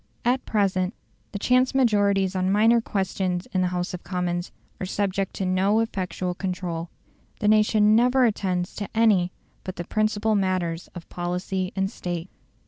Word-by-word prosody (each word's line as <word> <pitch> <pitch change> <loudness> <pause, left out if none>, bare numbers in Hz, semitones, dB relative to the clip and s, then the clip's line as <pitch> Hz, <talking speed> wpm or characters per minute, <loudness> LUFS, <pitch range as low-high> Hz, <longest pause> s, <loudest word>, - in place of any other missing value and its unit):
At 255 +2 +2
present 190 -2 +1 0.4
the 205 - -4
chance 255 +5 +2
majorities 200 -6 +2
on 185 0 +1
minor 225 +3 +4
questions 190 -3 -2
in 185 - +2
the 180 - +2
House 180 +1 -2
of 180 - -6
Commons 175 -1 -2 0.3
are - - -3
subject 195 0 -1
to 190 - -2
no 190 +4 +2
effectual 185 -4 -2
control. 175 -2 -4 0.5
The 210 - 0
nation 215 0 +4
never 250 +2 +4
attends 185 -5 -1
to 205 - -4
any 200 -6 +4 0.3
but 185 - -6
the 175 - -4
principal 215 +2 0
matters 185 -4 0
of 175 - -9
policy 180 +2 -3
and 195 0 +1
State. 175 0 -5
190 Hz, 155 wpm, -25 LUFS, 180-215 Hz, 0.5 s, minor